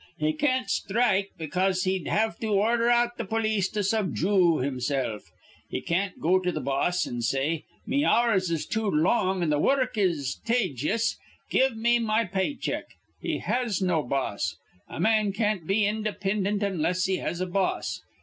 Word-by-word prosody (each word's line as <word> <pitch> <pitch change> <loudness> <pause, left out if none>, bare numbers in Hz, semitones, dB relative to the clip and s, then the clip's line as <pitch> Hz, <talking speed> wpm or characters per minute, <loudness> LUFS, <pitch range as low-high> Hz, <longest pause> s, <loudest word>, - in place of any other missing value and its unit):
He 155 0 +1
can't 255 - 0
sthrike, 200 -1 +1
because 185 +3 0
he'd 185 -3 -1
have 220 -5 0
to 225 - -3
ordher 230 +4 +2
out 240 0 +2
th' 220 -5 -4
polis 215 -4 +1
to 210 -1 -2
subjoo 185 - +2
himsilf. 130 -4 -2 0.4
He - - -2
can't 185 +3 -1
go 185 +3 +3
to 180 -1 -1
th' - - -4
boss, 140 +7 0
an' 120 0 -4
say: 135 +7 -1 0.2
'Me 280 +4 +1
hours 220 - +3
is 165 -2 -1
too 220 -1 -1
long 185 +3 +2
an' 155 - +1
th' 150 0 +2
wurruk 260 - +1
is 160 -9 0
tajious. 220 - 0 0.3
Give 260 -3 +2
me 235 +2 +3
me 225 0 +1
pay 190 +9 -1
check.' 260 - -3 0.3
He - - -1
has 245 -5 0
no 180 -4 +1
boss. 135 0 -2 0.3
A - - -7
man 215 +1 +2
can't 210 -5 -1
be 200 +3 +2
indipindint 205 -1 -1
onless 180 -2 0
he 190 -1 +1
has 175 - -3
a 185 - 0
boss. 185 +1 -1
195 Hz, 170 wpm, -26 LUFS, 170-220 Hz, 0.4 s, go